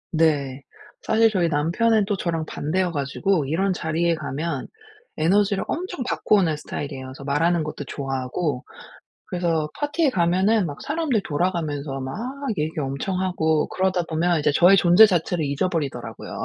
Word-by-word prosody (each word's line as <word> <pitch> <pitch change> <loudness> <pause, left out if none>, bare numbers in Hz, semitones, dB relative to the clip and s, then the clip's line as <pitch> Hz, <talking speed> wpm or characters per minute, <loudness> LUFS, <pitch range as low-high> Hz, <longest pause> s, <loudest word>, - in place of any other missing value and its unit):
네. 145 -4 +1 0.4
사실 225 0 +3
저희 175 -4 +1
남편은 200 +9 +2
또 205 0 -1
저랑 165 -4 -2
반대여 175 +5 -1
가지고 150 +3 0
이런 185 +7 0
자리에 170 0 0
가면 155 -1 -4 0.5
에너지를 200 +4 +2
엄청 360 -5 -3
받고 215 - +1
오는 170 -6 +2
스타일이에요. 140 -2 -6
그래서 130 +1 -10
말하는 160 +4 +1
것도 150 -1 -5
좋아하고 135 +1 -3 0.6
그래서 165 -4 -1
파티에 290 +1 +1
가면은 190 +2 +2
막 145 -3 -6
사람들이 295 -7 0
돌아가면서 150 -5 -2
막 130 +1 -5 0.4
얘기 155 +1 -1
엄청 145 +7 -2
하고 160 -4 +1
그러다 185 -1 0
보면 170 +1 +1
이제 150 - +2
저의 175 +6 +6
존재 180 +4 +7
자체를 175 -4 0
잊어버리더라고요. 145 0 -3
170 Hz, 365 characters per minute, -23 LUFS, 145-190 Hz, 0.6 s, 존재